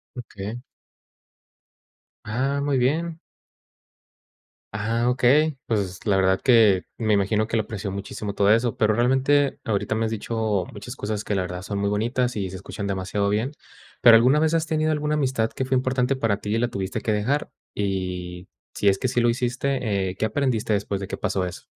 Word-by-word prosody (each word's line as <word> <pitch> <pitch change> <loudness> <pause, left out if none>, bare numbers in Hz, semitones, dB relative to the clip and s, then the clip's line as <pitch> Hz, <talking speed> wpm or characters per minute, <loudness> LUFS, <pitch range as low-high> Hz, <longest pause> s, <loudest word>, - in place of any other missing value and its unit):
Okey. 110 -1 -7 1.6
Ah, 135 +6 -1
muy 140 -2 +1
bien. 160 +6 0 1.5
Ah, 115 +3 0
okey. 135 +4 +3
Pues, 100 -4 -2
la 100 -2 +3
verdad 95 0 +2
que 110 -7 +5
me 110 -2 +1
imagino 105 +2 +1
que 115 - -2
le 110 - +2
apreció 100 -1 -5
muchísimo 100 +1 -5
todo 100 0 +3
eso, 115 +2 +2
pero 110 -3 +2
realmente 135 +4 +2
ahorita 110 -1 -1
me 110 - 0
has 110 - -2
dicho 110 -3 -1
muchas 120 +5 -8
cosas 105 0 -3
que 105 - -2
la 95 - 0
verdad 90 0 -5
son 100 +1 -4
muy 100 - 0
bonitas 120 +4 0
y 95 -3 -2
se 95 - -7
escuchan 100 +2 -6
demasiado 100 +1 -1
bien. 110 +7 -1 0.5
Pero, 115 -1 +9
¿alguna 130 +6 +4
vez 160 +1 +2
has 165 -1 +1
tenido 155 0 +1
alguna 150 0 -1
amistad 130 -6 0
que - - -3
fue 130 0 +1
importante 130 +1 0
para 110 -5 0
ti 105 - -2
y - - +1
la 120 - +1
tuviste 95 -4 -3
que 110 - -1
dejar? 120 +8 0 0.2
Y 90 -2 -3 0.2
si 100 - +2
es 95 0 +1
que - - 0
sí 125 0 +1
lo 120 - +3
hiciste, 125 -5 -1
eh, 90 - -6
¿qué - - 0
aprendiste 115 -2 0
después 100 -1 -1
de 95 - -5
que - - -4
pasó 95 -2 -1
eso? 90 - -7
110 Hz, 190 wpm, -24 LUFS, 100-130 Hz, 1.6 s, Pero